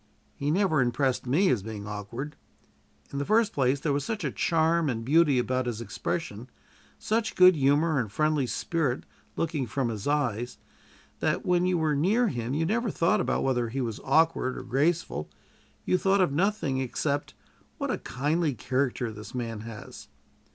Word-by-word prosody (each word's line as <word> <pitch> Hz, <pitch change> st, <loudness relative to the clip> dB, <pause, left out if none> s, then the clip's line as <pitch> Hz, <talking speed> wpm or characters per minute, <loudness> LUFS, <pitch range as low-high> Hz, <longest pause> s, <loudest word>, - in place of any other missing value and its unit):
He 140 Hz, -, -3 dB
never 165 Hz, -3 st, +2 dB
impressed 125 Hz, +1 st, 0 dB
me 175 Hz, +10 st, +3 dB
as 120 Hz, -, +1 dB
being 105 Hz, 0 st, -7 dB
awkward. 105 Hz, +8 st, -6 dB, 0.8 s
In 140 Hz, -, -2 dB
the -, -, 0 dB
first 215 Hz, +6 st, +2 dB
place, 135 Hz, 0 st, +2 dB
there 145 Hz, 0 st, 0 dB
was 140 Hz, 0 st, 0 dB
such 210 Hz, +4 st, -3 dB
a 140 Hz, -, -1 dB
charm 165 Hz, 0 st, +2 dB
and 115 Hz, -2 st, -3 dB
beauty 150 Hz, 0 st, +4 dB
about 130 Hz, +1 st, 0 dB
his 115 Hz, -2 st, -3 dB
expression, 115 Hz, -, -4 dB, 0.5 s
such 220 Hz, -, -1 dB
good 185 Hz, 0 st, +7 dB
humor 145 Hz, +2 st, +3 dB
and 110 Hz, -5 st, -3 dB
friendly 155 Hz, 0 st, +1 dB
spirit 140 Hz, +2 st, -1 dB, 0.3 s
looking 155 Hz, -6 st, -1 dB
from 130 Hz, +2 st, -1 dB
his 110 Hz, 0 st, -4 dB
eyes, 125 Hz, -5 st, -1 dB, 0.6 s
that -, -, 0 dB
when 180 Hz, 0 st, +2 dB
you 180 Hz, -1 st, +2 dB
were 155 Hz, -2 st, +1 dB
near 210 Hz, +11 st, +2 dB
him 120 Hz, 0 st, -3 dB
you 160 Hz, +2 st, +1 dB
never 225 Hz, +5 st, 0 dB
thought 170 Hz, -2 st, +2 dB, 0.2 s
whether 125 Hz, -3 st, 0 dB
he 135 Hz, +4 st, -3 dB
was 115 Hz, -4 st, -3 dB
awkward 150 Hz, -3 st, +2 dB
or -, -, -6 dB
graceful; 135 Hz, -, 0 dB, 0.6 s
you 185 Hz, -, +2 dB
thought 195 Hz, +1 st, +3 dB
of 180 Hz, -6 st, +3 dB
nothing 165 Hz, -4 st, 0 dB
except, 140 Hz, +3 st, -2 dB, 0.4 s
What -, -, -2 dB
a -, -, -2 dB
kindly 150 Hz, +3 st, -1 dB
character 125 Hz, -2 st, -1 dB
this 105 Hz, +1 st, -10 dB
man 115 Hz, -3 st, -3 dB
has! 110 Hz, -1 st, -9 dB
140 Hz, 170 wpm, -27 LUFS, 120-165 Hz, 0.8 s, good